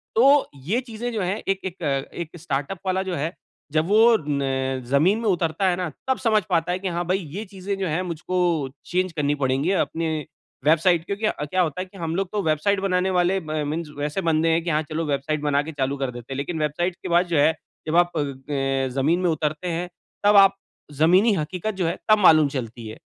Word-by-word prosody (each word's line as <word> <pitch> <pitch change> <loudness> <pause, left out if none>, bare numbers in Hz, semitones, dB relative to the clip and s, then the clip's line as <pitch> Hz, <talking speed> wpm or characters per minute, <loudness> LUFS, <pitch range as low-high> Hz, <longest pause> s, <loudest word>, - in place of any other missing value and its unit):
तो 275 +4 +5 0.2
ये 215 +10 +1
चीजें 240 -1 -5
जो 215 - -1
है 185 +2 -1
एक 195 0 +1
एक 185 -1 -6 0.3
एक 170 0 -6
स्टार्टअप 145 +3 -3
वाला 190 0 +1
जो 185 -2 -3
है, 160 +3 -2 0.4
जब 155 +2 +1
वो 225 +3 +6
न 135 -2 -1
जमीन 165 - +3
में 230 - -2
उतरता 175 +1 +1
है 180 - +1
ना 180 -2 -2 0.2
तब 260 -1 +2
समझ 220 -3 +3
पाता 170 -1 +1
है 180 - -1
कि 195 - -4
हाँ 175 - -1
भाई 185 +2 +2 0.2
ये 205 +4 -4
चीजें 195 0 -5
जो 190 - -1
है 165 +3 0
मुझको 175 +1 -4 0.5
चेंज 185 +1 +1
करनी 145 -2 0
पड़ेगी 135 +6 +1
अपने 165 0 -3 0.6
वेबसाइट 165 +2 +3
क्योंकि 200 +4 -3
अ, 150 -8 -1
क्या 185 +5 0
होता 170 0 -1
है - - -4
कि 190 +1 -16
हम 165 -2 -3
लोग 190 0 -1
तो 210 - -1
वेबसाइट 160 +6 +1
बनाने 190 -1 +1
वाले 180 +2 +2
म 155 -1 -2
मीन्स 160 +1 -3
वैसे 150 +5 -2
बंदे 160 +1 +2
हैं 165 +1 +1
कि 175 - -2
हाँ 155 -1 +2
चलो 160 +1 -2
वेबसाइट 145 +1 -1
बना 145 -1 +2
के 160 - -6
चालू 140 -1 -2
कर 135 -2 -2
देते 120 +2 -8
हैं। - - -5
लेकिन 160 +4 -3
वेबसाइट 165 +4 -1
के - - -4
बाद 175 +1 +4
जो - - +3
है 155 +3 +5 0.3
जब 155 - 0
आप 175 -1 +3
अ, - - +2 0.8
जमीन 160 +6 +2
में 180 - +2
उतरते 155 +1 -2
हैं 175 +2 -3 0.4
तब 205 0 +6
आप 195 0 0 0.4
जमीनी 185 +7 +5
हकीकत 180 +6 -3
जो 185 -3 -1
है 170 - -2
तब 215 - +7
मालूम 155 -2 +6
चलती 120 -4 -5
है। 110 - -8
170 Hz, 225 wpm, -23 LUFS, 150-190 Hz, 0.8 s, तब